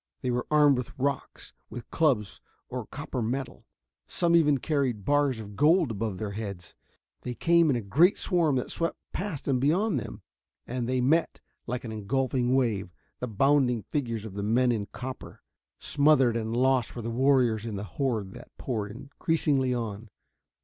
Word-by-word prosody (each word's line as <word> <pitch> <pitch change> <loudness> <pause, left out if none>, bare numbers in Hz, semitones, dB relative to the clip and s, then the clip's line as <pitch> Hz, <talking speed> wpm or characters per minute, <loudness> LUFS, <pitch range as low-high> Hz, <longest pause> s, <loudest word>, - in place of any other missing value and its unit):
They 125 - 0
were 120 0 -2
armed 150 -3 +5
with 125 - -7
rocks, 140 0 -3 0.2
with 120 -2 -9
clubs 130 -11 +1 0.3
or 125 -3 -5
copper 135 -2 -5
metal 125 +4 -4 0.4
some 170 -1 +1
even 150 -4 +4
carried 130 -9 -1
bars 145 -4 +2
of 105 -2 -9
gold 155 - +4
above 105 -2 -3
their 105 0 -4
heads. 100 -4 -6 0.5
They 125 -1 -5
came 170 +1 +4
in 135 - +3
a 120 - -1
great 155 - +4
swarm 170 -7 +1
that 125 - -2
swept 165 0 -1 0.2
past 185 -7 -4
and 130 -3 +1
beyond 170 - +2
them. - - -8 0.4
And 120 0 -3
they 130 -1 +1
met, 155 +7 +2 0.3
like 125 +1 -3
an 115 - -6
engulfing 125 +3 0
wave, 110 -8 0 0.3
the 125 - -3
bounding 125 0 +2
figures 115 -4 -3
of 105 - -8
the 100 - -4
men 120 +4 +2
in 105 -4 -2
copper. 130 +6 -8 0.3
Smothered 140 -5 +3
and 115 0 -2
lost 130 -2 +2
were 120 - -5
the 115 - -3
warriors 125 -3 +3
in 115 -3 -4
the 100 - -4
horde 105 -1 -2
that - - -12
poured 110 -5 -3
increasingly 135 +2 -1
on. 115 -3 -4
125 Hz, 170 wpm, -28 LUFS, 110-140 Hz, 0.5 s, armed